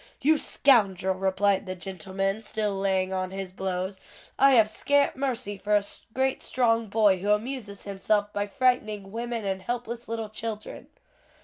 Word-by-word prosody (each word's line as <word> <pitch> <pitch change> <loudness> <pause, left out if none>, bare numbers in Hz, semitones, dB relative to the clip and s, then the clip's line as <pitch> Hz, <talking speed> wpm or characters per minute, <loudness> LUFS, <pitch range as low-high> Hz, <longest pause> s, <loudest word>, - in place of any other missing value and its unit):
"You 305 +2 +3
scoundrel!" 195 -8 +3
replied 195 +1 +1
the 185 - -3
gentleman, 195 +2 -3
still 215 -2 -2
laying 190 -1 0
on 185 0 -1
his 190 -1 -5
blows, 190 0 -3 0.4
"I 275 0 +7
have 225 -4 +6
scant 285 +6 +1
mercy 245 -7 -2
for 210 +2 +1
a 205 - +3 0.3
great 265 0 +1
strong 230 -3 +1
boy 205 -2 +3
who 200 +3 -2
amuses 210 -1 -1
himself 205 +1 0
by 205 0 -1
frightening 215 -4 0
women 230 -1 -3
and 190 -1 -2
helpless 240 +3 -4
little 225 -1 -3
children." 215 0 -6
205 Hz, 150 wpm, -27 LUFS, 195-230 Hz, 0.4 s, I